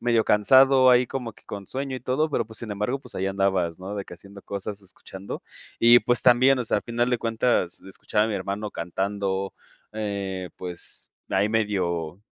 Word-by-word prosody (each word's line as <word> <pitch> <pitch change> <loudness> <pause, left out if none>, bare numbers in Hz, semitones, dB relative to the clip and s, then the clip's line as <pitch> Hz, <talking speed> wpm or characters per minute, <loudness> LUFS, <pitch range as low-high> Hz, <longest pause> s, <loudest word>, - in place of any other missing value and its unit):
medio 115 -2 +2
cansado, 130 +4 +6
ahí 125 0 +5
como 125 -4 -4
que - - -22
con 100 -2 -7
sueño 135 0 -4
y - - -8
todo, 150 +5 0
pero 115 - 0
pues, 110 -1 -7
sin 115 -3 -6
embargo, 105 +7 -2
pues, - - -9
ahí 95 - -1
andabas, 95 -3 0
¿no?, 100 +2 -6
de 100 - -4
que - - -10
haciendo 100 +2 -13
cosas, 100 +1 -5
escuchando 95 0 -9 0.4
y 120 +1 +8
pues, 120 -1 +1
también, 130 +2 +5
o - - -2
sea, 110 - +1
al - - -2
final 120 +1 0
de 120 - +1
cuentas, 115 -5 0
escuchaba 105 +2 -1
a - - -1
mi 105 - -2
hermano 100 +2 -3
cantando, 95 +2 -2 0.4
eh, 100 -4 -4
pues, 90 -2 -5 0.2
ahí 100 +2 +2
medio 95 -6 -1
105 Hz, 195 wpm, -25 LUFS, 95-120 Hz, 0.4 s, y